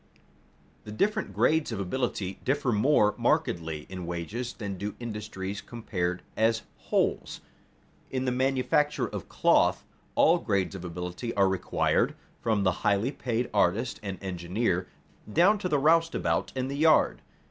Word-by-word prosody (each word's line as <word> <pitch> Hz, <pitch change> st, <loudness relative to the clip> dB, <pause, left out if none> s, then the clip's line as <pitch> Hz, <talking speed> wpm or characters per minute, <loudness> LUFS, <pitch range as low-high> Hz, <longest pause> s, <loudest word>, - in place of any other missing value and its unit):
The 105 Hz, -, -9 dB
different 210 Hz, -, 0 dB
grades 160 Hz, -4 st, +2 dB
of 110 Hz, -, -3 dB
ability 100 Hz, -2 st, -2 dB
differ 135 Hz, -1 st, +1 dB
more 105 Hz, -2 st, +4 dB
markedly 85 Hz, -, 0 dB
in 90 Hz, -2 st, -7 dB
wages 95 Hz, +9 st, -4 dB
than 100 Hz, -5 st, -5 dB
do 100 Hz, +3 st, -5 dB
industries 105 Hz, -4 st, -5 dB
compared 90 Hz, -6 st, -3 dB
as 110 Hz, 0 st, +2 dB, 0.3 s
wholes. -, -, 0 dB, 0.7 s
In 130 Hz, 0 st, -2 dB
the 125 Hz, -, +1 dB
manufacture 135 Hz, +3 st, +1 dB
of -, -, -7 dB
cloth -, -, +3 dB, 0.3 s
all 170 Hz, +2 st, +5 dB
grades 100 Hz, -, 0 dB
of 95 Hz, -2 st, -7 dB
ability 90 Hz, +6 st, -5 dB
are 100 Hz, -1 st, +4 dB
required, 95 Hz, -2 st, +1 dB, 0.3 s
from 110 Hz, -3 st, +1 dB
the 95 Hz, -, +3 dB
highly 105 Hz, +5 st, +2 dB
paid 120 Hz, -3 st, -2 dB
artist -, -, +1 dB
and 100 Hz, -2 st, -5 dB
engineer, 90 Hz, +1 st, -1 dB, 0.4 s
down 190 Hz, -, +4 dB
to 180 Hz, -, -2 dB
the 150 Hz, -, +3 dB
roustabout 165 Hz, +3 st, +2 dB
in 130 Hz, 0 st, -1 dB
the 140 Hz, +1 st, -4 dB
yard. 155 Hz, +1 st, +4 dB
110 Hz, 140 wpm, -28 LUFS, 95-135 Hz, 0.7 s, all